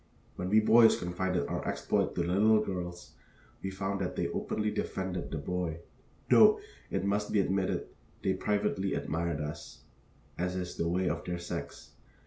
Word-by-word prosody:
When 90 Hz, -, -3 dB
we 110 Hz, +2 st, +5 dB
boys 115 Hz, +1 st, +6 dB
confided 90 Hz, -2 st, -1 dB
our -, -, -3 dB
exploit -, -, 0 dB
to 85 Hz, -, +1 dB
the 85 Hz, +1 st, -1 dB
little 110 Hz, +3 st, +5 dB
girls, 90 Hz, -2 st, -5 dB, 0.5 s
we 95 Hz, -, -3 dB
found 95 Hz, 0 st, -3 dB
that 90 Hz, -, -2 dB
they -, -, -1 dB
openly 105 Hz, 0 st, -1 dB
defended 95 Hz, -3 st, -3 dB
the -, -, -3 dB
boy, 85 Hz, +2 st, -2 dB, 0.5 s
though, -, -, +7 dB, 0.3 s
it 95 Hz, -, -1 dB
must 105 Hz, +1 st, 0 dB
be 105 Hz, -, +3 dB
admitted, 95 Hz, 0 st, 0 dB, 0.4 s
they -, -, +2 dB
privately 100 Hz, -2 st, 0 dB
admired 80 Hz, 0 st, -2 dB
us, 75 Hz, +3 st, -7 dB, 0.6 s
as 90 Hz, +1 st, -1 dB
is 90 Hz, -1 st, -4 dB
the 85 Hz, -, -1 dB
way 90 Hz, +1 st, +1 dB
of -, -, -1 dB
their 90 Hz, -1 st, -2 dB
sex. 85 Hz, 0 st, -6 dB
90 Hz, 165 wpm, -31 LUFS, 90-100 Hz, 0.6 s, though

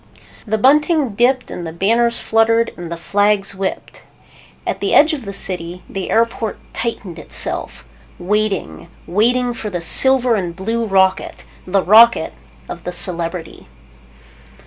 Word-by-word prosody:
The 220 Hz, +1 st, 0 dB
bunting 295 Hz, +4 st, +2 dB
dipped 250 Hz, +4 st, 0 dB
and 170 Hz, -, -6 dB
the -, -, -6 dB
banners 230 Hz, +7 st, +1 dB
fluttered 225 Hz, +1 st, +1 dB
and 175 Hz, -1 st, -9 dB
the 170 Hz, -, -5 dB
flags 205 Hz, +3 st, 0 dB
whipped. 190 Hz, 0 st, -6 dB, 0.6 s
At -, -, -3 dB
the -, -, 0 dB
edge 310 Hz, +2 st, +5 dB
of 270 Hz, -6 st, -6 dB
the 200 Hz, -, -6 dB
city, 180 Hz, -3 st, -5 dB
the 195 Hz, -1 st, -6 dB
airport 230 Hz, -1 st, -1 dB, 0.2 s
tightened 205 Hz, -7 st, -5 dB
itself. 155 Hz, -, -4 dB, 0.3 s
Waiting, 195 Hz, -, -2 dB, 0.2 s
waiting 240 Hz, +6 st, +1 dB
for 220 Hz, -2 st, -6 dB
the 180 Hz, -3 st, -4 dB
silver 255 Hz, +7 st, +6 dB
and 180 Hz, -5 st, -3 dB
blue 225 Hz, +5 st, -3 dB
rocket. 190 Hz, -1 st, 0 dB, 0.2 s
The 190 Hz, +1 st, +1 dB
rocket 230 Hz, +4 st, +5 dB, 0.3 s
of -, -, -9 dB
the -, -, -5 dB
Celebrity. 170 Hz, -, -5 dB
210 Hz, 140 wpm, -17 LUFS, 185-235 Hz, 0.6 s, silver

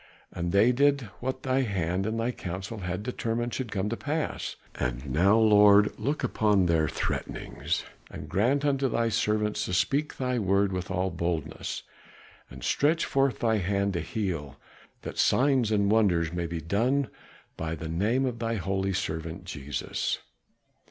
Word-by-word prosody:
And 85 Hz, 0 st, -3 dB
they 105 Hz, +6 st, +5 dB
did 140 Hz, +2 st, +3 dB, 0.2 s
what 130 Hz, +1 st, -3 dB
thy 130 Hz, 0 st, +2 dB
hand 95 Hz, -4 st, -1 dB
and 110 Hz, +1 st, -2 dB
thy 115 Hz, +2 st, 0 dB
counsel 95 Hz, +1 st, -6 dB
had 90 Hz, +1 st, -3 dB
determined 120 Hz, 0 st, -2 dB
should 125 Hz, -5 st, -3 dB
come 100 Hz, 0 st, -1 dB
to 115 Hz, -, -1 dB
pass. 150 Hz, +5 st, -3 dB, 0.2 s
And 60 Hz, +1 st, -3 dB
now, 90 Hz, +11 st, +4 dB
Lord, 105 Hz, -2 st, +6 dB
look 145 Hz, +3 st, -1 dB
upon 105 Hz, -4 st, +2 dB
their 80 Hz, -2 st, +2 dB
threatenings, -, -, -3 dB, 0.3 s
and -, -, -8 dB
grant 130 Hz, +9 st, +1 dB
unto 135 Hz, -2 st, +2 dB
thy 115 Hz, 0 st, +1 dB
servants 105 Hz, -1 st, 0 dB
to 90 Hz, -, -2 dB
speak 145 Hz, +11 st, 0 dB
thy 125 Hz, -2 st, 0 dB
word 100 Hz, -1 st, +2 dB
with 90 Hz, -1 st, -3 dB
all 95 Hz, +1 st, 0 dB
boldness, 85 Hz, -2 st, -3 dB, 0.7 s
and -, -, -11 dB
stretch 155 Hz, +3 st, +2 dB
forth 135 Hz, -3 st, +1 dB
thy 110 Hz, -2 st, +2 dB
hand 100 Hz, +1 st, 0 dB
to 85 Hz, -, -1 dB
heal, 85 Hz, -6 st, -3 dB, 0.5 s
that -, -, -6 dB
signs 130 Hz, -4 st, +3 dB
and 100 Hz, -1 st, +2 dB
wonders 90 Hz, -7 st, +3 dB
may 85 Hz, -1 st, -2 dB
be 85 Hz, -1 st, -4 dB
done 120 Hz, -, +1 dB, 0.5 s
by 80 Hz, 0 st, -3 dB
the 80 Hz, +1 st, -6 dB
name 105 Hz, +11 st, +1 dB
of 120 Hz, -3 st, -3 dB
thy 115 Hz, 0 st, -1 dB
holy 95 Hz, 0 st, -1 dB
servant 80 Hz, -2 st, -3 dB
Jesus." 75 Hz, -5 st, -3 dB
105 Hz, 160 wpm, -28 LUFS, 90-120 Hz, 0.7 s, Lord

